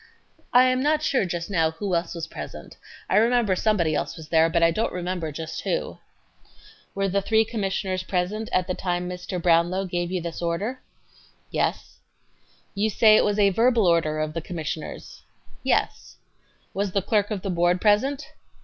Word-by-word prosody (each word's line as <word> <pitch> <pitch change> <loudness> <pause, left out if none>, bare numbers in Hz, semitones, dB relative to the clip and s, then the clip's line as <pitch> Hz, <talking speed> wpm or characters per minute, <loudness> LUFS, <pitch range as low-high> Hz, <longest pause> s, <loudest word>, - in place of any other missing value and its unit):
A. - - +5
I 250 - +8
am 255 0 +2
not 305 +2 +1
sure 265 -8 +1
just 175 +1 -4
now 165 -4 +2
who 180 +4 -4
else 170 0 -1
was 165 -1 -4
present. - - -9 0.3
I - - +2
remember 230 -3 +3
somebody 180 -6 +1
else 165 - -2
was 160 -1 -11
there, 160 0 +4
but 170 0 +1
I 165 - +5
don't 220 +7 -1
remember 180 -3 -3
just 160 +2 -6
who.... - - 0
Q. - - -9 1.0
Were 195 0 0
the 200 +1 0
three 220 +2 +2
commissioners 195 -4 -2
present 190 +4 -2
at 185 - +1
the 185 - -2
time 180 -1 -2
Mr. 180 0 -7
[Commissioner] 180 - -2
Brownlow 175 +3 +2
gave 175 -1 -3
you 185 - -1
this 170 0 -6
order? 195 +10 -2
A. - - -35 0.3
Yes. - - -2 0.7
Q. 205 +1 0
You - - +2
say 215 +1 +5
it - - +5
was 205 0 0
a 200 -1 +4
verbal 230 +1 +3
order 165 -3 +2
of 155 0 -2
the 165 - -3
Commissioners? 160 -2 -6
A. - - -36
Yes. - - -1 0.6
Q. 190 - -7
Was 200 -2 -1
the 195 - +1
clerk 205 0 +1
of 205 -4 -4
the 195 - -2
Board 175 +1 +2
present? 265 +8 +1
185 Hz, 200 wpm, -24 LUFS, 170-210 Hz, 1.0 s, I